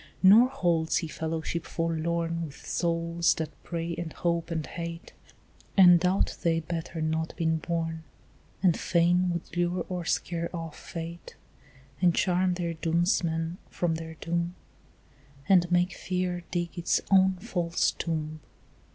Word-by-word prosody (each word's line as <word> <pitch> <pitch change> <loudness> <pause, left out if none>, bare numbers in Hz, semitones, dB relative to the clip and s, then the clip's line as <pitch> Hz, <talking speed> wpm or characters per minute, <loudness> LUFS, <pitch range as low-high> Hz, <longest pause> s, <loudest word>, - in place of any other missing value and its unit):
Nor 215 +6 +8
holds 170 -11 +1
he 165 - -1
fellowship 160 +1 -3
forlorn 165 0 -1
With 150 -3 -9
souls 170 0 +1
that 160 -1 -3
pray 170 0 -3
and 170 -1 -5
hope 170 0 -1
and 160 -2 -2
hate, 170 0 -7 0.6
And 180 -2 +8
doubt 185 +3 +1
they 170 -3 +2
had 165 -1 -3
better 165 -1 -4
not 160 +1 -1
been 160 -1 +1
born, 165 0 -2 0.6
And 175 -3 +4
fain 175 +1 +3
would 170 -1 -4
lure 175 0 0
or 180 -2 -3
scare 170 0 -1
off 165 -2 -6
fate 170 +1 -7 0.7
And 175 -2 +4
charm 180 0 +2
their 170 -2 -2
doomsman 165 0 0
from 175 -2 -1
their 160 0 -6
doom 170 +2 -2 0.9
And 180 -2 +4
make 175 +1 +3
fear 180 -1 -2
dig 175 0 -3
its 170 - +1
own 190 0 +6
false 175 -4 0
tomb. 155 -1 -3
170 Hz, 140 wpm, -28 LUFS, 165-175 Hz, 0.9 s, Nor